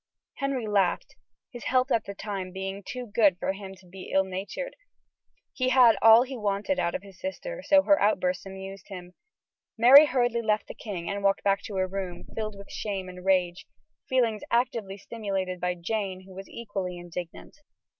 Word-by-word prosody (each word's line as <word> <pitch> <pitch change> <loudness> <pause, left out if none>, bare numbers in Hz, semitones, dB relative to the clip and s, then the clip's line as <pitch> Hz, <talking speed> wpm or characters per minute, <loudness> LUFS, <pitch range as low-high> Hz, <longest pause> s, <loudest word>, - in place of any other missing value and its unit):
Henry 275 -4 -2
laughed, 200 -4 0 0.4
his 240 -3 -9
health 255 +1 +2
at 225 - +2
that 200 0 -8
time 195 -3 -5
being 195 +1 -5
too 250 +5 -6
good 205 -4 +3
for 190 - -1
him 195 -1 -9
to 190 0 -20
be 185 +1 -10
ill 190 - +4
natured. 195 - -5 0.8
He 255 -1 0
had 250 -3 +6
all 225 +2 +8
he 265 +1 -7
wanted 210 +5 -1
out 170 - 0
of 185 - -4
his 195 -2 -15
sister, - - -5
so 290 -1 +5
her 295 0 +4
outbursts 185 -2 +1
amused 195 0 -9
him. 180 -2 -9 0.6
Mary 270 +6 +9
hurriedly 245 -3 +1
left 215 -2 +1
the - - -7
king 185 -6 -6
and 200 0 -3
walked 195 0 +2
back 200 0 +2
to 205 - -6
her 185 0 +1
room, 185 -2 -5
filled 215 -2 -3
with 200 - -12
shame 195 -3 -4
and 180 0 -10
rage; 180 -2 +1 0.4
feelings 235 -5 +1
actively 230 -5 0
stimulated 195 -4 -4
by 180 0 -1
Jane, 190 +1 -3
who 190 0 -14
was 195 +1 -9
equally 195 -6 -5
indignant. 175 -1 -8
200 Hz, 185 wpm, -27 LUFS, 185-235 Hz, 0.8 s, Mary